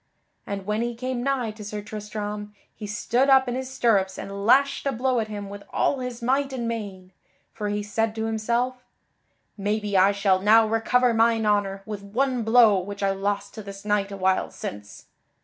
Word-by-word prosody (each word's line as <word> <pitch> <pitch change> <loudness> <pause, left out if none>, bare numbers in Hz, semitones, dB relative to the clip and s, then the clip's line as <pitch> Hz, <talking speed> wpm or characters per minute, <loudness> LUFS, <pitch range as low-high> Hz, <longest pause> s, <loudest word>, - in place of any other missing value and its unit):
And 200 -2 -4
when 210 +2 -1
he 240 0 -2
came 255 +1 -3
nigh 255 -4 0
to 215 0 -11
Sir 210 0 -5
Tristram, 210 0 -6 0.2
he 210 - -8
stood 240 +6 +1
up 265 -1 +6
in 245 - -1
his 260 +1 -4
stirrups 215 -7 +1
and 200 +1 -5
lashed 275 +3 +4
a - - +2
blow 255 0 0
at 220 - -2
him 205 -2 -6
with 200 0 -8
all 275 - +1
his 250 -1 -6
might 270 +3 +1
and 245 -3 -3
main; 200 -5 -5 0.4
for 210 -2 -3
he 205 0 -2
said 220 +1 -1
to 220 0 -2
himself: 235 +3 -1 0.8
"Maybe 205 0 -1
I 190 +1 +6
shall 200 -2 +2
now 220 +2 +6
recover 235 +2 +2
mine 225 0 +3
honor 200 -2 +1
with 210 -2 -6
one 245 +5 -1
blow 225 -3 +5
which 200 +2 -6
I 195 - +3
lost 200 +1 -2
to 220 - -7
this 200 0 -10
knight 205 -1 0
a 200 - -6
while 190 0 +1
since." 105 0 -8
215 Hz, 195 wpm, -25 LUFS, 200-240 Hz, 0.8 s, up